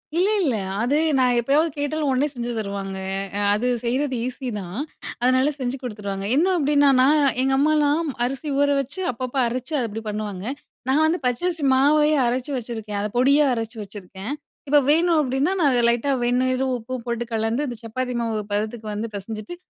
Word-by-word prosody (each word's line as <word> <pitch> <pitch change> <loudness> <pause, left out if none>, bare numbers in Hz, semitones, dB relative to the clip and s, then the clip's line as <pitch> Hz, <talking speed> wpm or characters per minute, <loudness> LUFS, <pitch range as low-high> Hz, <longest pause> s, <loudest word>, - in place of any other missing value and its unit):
இல்ல, 360 +3 +3
இல்ல, 275 -10 +1 0.3
அது 255 +5 +2 0.2
நான் 250 -1 +3
எப்பயாவது 285 +7 +2
கேட்டாலும் 290 +1 -1
உடனே 265 +2 +2
செஞ்சு 240 -1 -4
தருவாங்க. 200 -2 -4 0.4
அ, - - 0
அது 220 +4 0
செய்றது 260 +3 -1
ஈஸிதான், 215 -7 -5 0.4
அதனால 255 +3 +3
செஞ்சு 260 -1 -3
குடுத்துருவாங்க. 205 -5 -5
என்ன 310 +5 +4
அப்பிடின்னா, 290 -2 +4
நான் 285 +4 +5 0.2
எங்க 270 +1 +2
அம்மாலாம் 300 +2 +2 0.2
அரிசி 270 +4 -4
ஊறவச்சு, 285 +2 +1
அப்பப்ப 255 +2 -6
அரச்சி, 255 +5 -4
அது 240 - 0
அப்பிடி 225 +1 -6
பண்ணுவாங்க. 210 -2 -4 0.4
நான் 295 +4 +4
வந்து 320 +2 +1
பச்சரிசி 325 +6 0
மாவையே 300 +3 +4
அரச்சு 255 +4 -2
வெச்சிருக்கேன், 220 -3 -5
அத 210 - -2
பொடியா 280 +4 +5
அரச்சி 225 0 -5
வெச்சிருக்கேன். 200 +1 -8 0.4
இப்ப 290 +1 +5
வேணும் 330 +2 +4
அப்பிடின்னா, 275 +5 +1
நான் 275 -5 +4
லைட்டா 240 +4 +1
வெந்நீரும் 255 +2 +1
உப்பும் 245 +1 -6
போட்டு 235 0 -2
கலந்து, 225 +6 0
இந்த 240 - -6
சப்பாத்தி 250 +2 -3
மாவு 225 -2 -1
பதத்துக்கு 215 +2 -2
வந்து 215 +2 -3
பெசஞ்சிட்டு, 215 - -7
255 Hz, 160 wpm, -23 LUFS, 225-285 Hz, 0.4 s, நான்